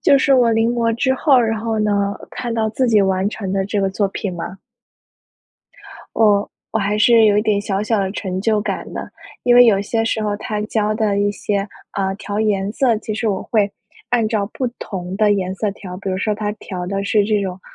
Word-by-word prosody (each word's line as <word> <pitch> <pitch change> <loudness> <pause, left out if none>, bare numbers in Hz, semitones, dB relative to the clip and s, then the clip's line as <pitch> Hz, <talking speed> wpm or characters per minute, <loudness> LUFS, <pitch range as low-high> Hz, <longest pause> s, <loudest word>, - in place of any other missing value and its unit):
就 280 - +5
是 275 0 +3
我 245 -2 +4
临 225 +1 +2
摹 230 -1 +1
之 260 +2 +1
后， 270 0 +4
然 225 -2 0
后 225 -1 -2
呢？ 200 -1 +1 0.2
看 240 -2 -4
到 220 -1 +1
自 255 +3 0
己 215 -3 +4
完 190 0 +1
成 200 -3 -5
的 195 0 0
这 205 0 -1
个 195 -1 +1
作 200 +1 0
品 195 -1 -4
吗？ 175 +3 -6 1.6
哦， 205 -2 +3 0.2
我 225 - +1
还 205 0 0
是 230 0 +6
有 205 -1 +4
一 - - +2
点 210 -2 +1
小 200 0 -2
小 215 0 0
的 190 -1 0
成 190 -3 -3
就 215 +1 +1
感 - - -4
的， - - -6 0.3
因 245 - +4
为 245 0 +9
有 200 -4 +4
些 225 +2 -1
时 220 -1 -1
候 205 -1 -1
它 210 0 -4
教 215 -1 0
的 215 -2 0
一 205 0 +2
些， 205 0 -2 0.2
呃， 195 -1 -1
调 205 0 -4
颜 205 -2 0
色， 240 -3 +2
其 215 0 -5
实 220 +1 -1
我 195 -2 -1
会 210 -3 +1 0.4
按 235 -3 +2
照 210 -2 -1
不 260 - -1
同 185 -2 -5
的 210 -1 +3
颜 185 -2 -1
色 205 +1 -1
调， 180 -2 -9
比 195 0 -4
如 185 - -1
说 210 +1 0
他 210 0 -3
调 185 -4 -6
的 195 +1 -2
是 205 0 +2
这 210 -1 +1
种， 185 -1 -5
210 Hz, 245 characters per minute, -19 LUFS, 195-225 Hz, 1.6 s, 为